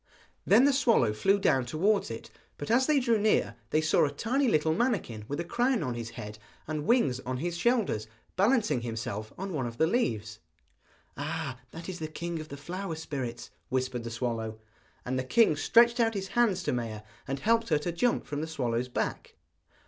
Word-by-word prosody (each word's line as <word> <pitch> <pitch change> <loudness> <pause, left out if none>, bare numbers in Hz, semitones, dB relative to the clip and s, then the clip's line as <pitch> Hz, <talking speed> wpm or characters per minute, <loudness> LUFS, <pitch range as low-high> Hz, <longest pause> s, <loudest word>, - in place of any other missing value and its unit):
Then 230 +6 +6
the 285 - +4
swallow 230 - +3
flew 195 - +3
down 135 -9 +2
towards 195 +8 +1
it; 115 0 -7 0.3
but 145 - -4
as 255 +3 +4
they 305 -2 +4
drew 235 -4 +2
near 210 - +2 0.2
they 155 - +2
saw 160 - +3
a 145 - +2
tiny 245 - 0
little 160 -6 +2
manikin 170 - -1
with 145 +2 -3
a - - 0
crown 240 +3 +1
on 125 -3 -2
his 115 -1 -5
head, 105 +1 -7 0.3
and 155 -1 -3
wings 225 - +3
on 130 0 -4
his 170 +5 -2
shoulders, 190 - +1 0.3
balancing 210 - +2
himself 110 -2 -4
on 195 0 -4
one 135 -6 -1
of 115 0 -8
the 160 - +4
leaves. 115 - -1 0.8
'Ah, 145 -3 -4
that 165 +6 -9
is 185 -2 -5
the 160 - -3
king 170 +2 -4
of 155 - -7
the 140 - -7
flower 180 +4 -5
spirits,' 140 -7 -5 0.2
whispered 130 -2 -1
the 115 - -5
swallow. 115 -2 -3 0.5
And 130 +1 -1
the - - -1
king 220 - +4
stretched 235 +9 +4
out 225 -1 +2
his 195 -1 -3
hands 210 -7 +2
to - - 0
Maia, 115 -3 -4 0.2
and 135 0 -2
helped 230 +4 +2
her 155 - +4
to 160 +4 -3
jump 235 +9 +1
from 145 0 -4
the 160 - -3
swallow's 125 -6 -1
back. - - -3
155 Hz, 200 wpm, -29 LUFS, -, 0.8 s, Then